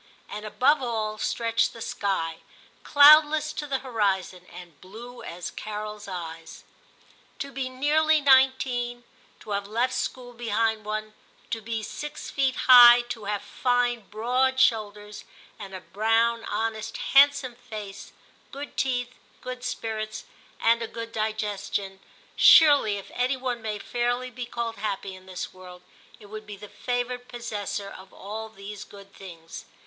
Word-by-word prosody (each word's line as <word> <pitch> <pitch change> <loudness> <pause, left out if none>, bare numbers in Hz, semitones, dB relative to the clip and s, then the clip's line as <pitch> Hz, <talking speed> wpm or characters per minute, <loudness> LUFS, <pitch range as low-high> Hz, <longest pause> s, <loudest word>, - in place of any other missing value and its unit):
And 210 +1 -7
above 265 +7 +3
all 220 -3 -3
stretched 230 +1 0
the 230 - -11
sky, 165 -7 -2 0.4
cloudless 305 +1 +6
to 300 -1 -5
the 275 -1 0
horizon, 190 -6 -1
and 175 -3 -13
blue 235 +6 -11
as 175 +1 -7
Carols 210 0 -6
eyes. 165 -3 -8 0.7
To 280 - -6
be 265 -1 -3
nearly 305 +4 +2
nineteen, 260 -3 +3 0.4
to 210 - -10
have 200 0 -2
left 240 +4 0
school 245 -1 -4
behind 225 -2 -1
one, 215 0 -4 0.4
to 225 - -2
be 225 0 -4
six 295 +7 -7
feet 265 -2 +1
high, 245 -1 +10
to 225 -4 -6
have 205 0 -2
fine 245 -3 0
broad 255 +4 0
shoulders, 210 -4 0 0.4
and 195 -2 -8
a 185 - -7
brown, 225 +4 +1
honest, 220 +1 -3 0.2
hand 285 +1 +8
some 255 -3 -6
face, 215 -5 -9 0.4
good 285 +2 -8
teeth, 250 -2 -1 0.3
good 255 -1 -7
spirits, 220 -3 -4 0.3
and 230 +1 +3
a 230 - -3
good 230 0 -7
digestion 210 -3 -3 0.2
— - - -30
surely 285 -10 +7
if 200 - -10
any 255 +2 0
one 250 -2 -3
may 215 -1 -3
fairly 245 +3 -2
be 245 0 -6
called 235 -1 -4
happy 200 -2 -4
in 185 0 -14
this 185 -1 -6
world, 180 -1 -13 0.4
it 210 - -14
would 215 +1 -9
be 205 -1 -8
the 210 +1 -10
favoured 245 0 -3
possessor 205 -4 -5
of 190 0 -12
all 220 +3 -7
these 205 -1 -9
good 200 -1 -15
things. 165 -4 -11
225 Hz, 150 wpm, -26 LUFS, 205-250 Hz, 0.7 s, high